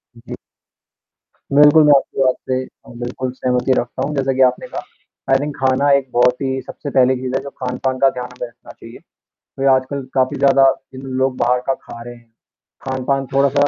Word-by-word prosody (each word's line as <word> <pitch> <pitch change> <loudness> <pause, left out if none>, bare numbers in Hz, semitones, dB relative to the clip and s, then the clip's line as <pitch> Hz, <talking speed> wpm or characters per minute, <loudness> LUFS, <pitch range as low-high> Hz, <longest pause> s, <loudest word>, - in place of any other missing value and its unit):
जी। 115 +1 -9 1.2
बिल्कुल, 150 +2 +7
मैं 150 - +7
आपकी 135 - -3
बात 130 -1 +3
से 130 - +1 0.5
बिल्कुल 125 +1 -4
सहमति 125 0 -1
रखता 120 - -5
हूँ, 150 - -4
जैसा 135 -1 0
कि 130 - 0
आपने 125 - -4
कहा, - - -6 0.5
आई 135 - +6
थिंक 145 0 -4
खाना 135 +1 +2
एक 135 -2 -5
बहुत 125 +1 +3
ही 130 -1 -1
सबसे 145 - -8
पहली 130 -1 +3
चीज़ 130 0 -3
है - - 0
जो 140 - -7
खान-पान 130 +1 -2
का 135 0 +5
ध्यान 125 - -4
भी 125 - -3
रखना 120 - -16
चाहिए। - - -13 0.6
वह 135 - +3
आजकल 130 +1 0
काफ़ी 130 -1 +1
ज़्यादा 135 -1 +5 0.2
जिन 130 - -9 0.2
लोग 130 -1 +1
बाहर 125 +1 +2
का 135 - +2
खा 115 - -11
रहे 120 0 -9
हैं, 115 -1 -21 0.6
खान-पान 130 +1 -1
थोड़ा-सा 140 +1 +3
130 Hz, 195 wpm, -18 LUFS, 125-135 Hz, 1.2 s, बिल्कुल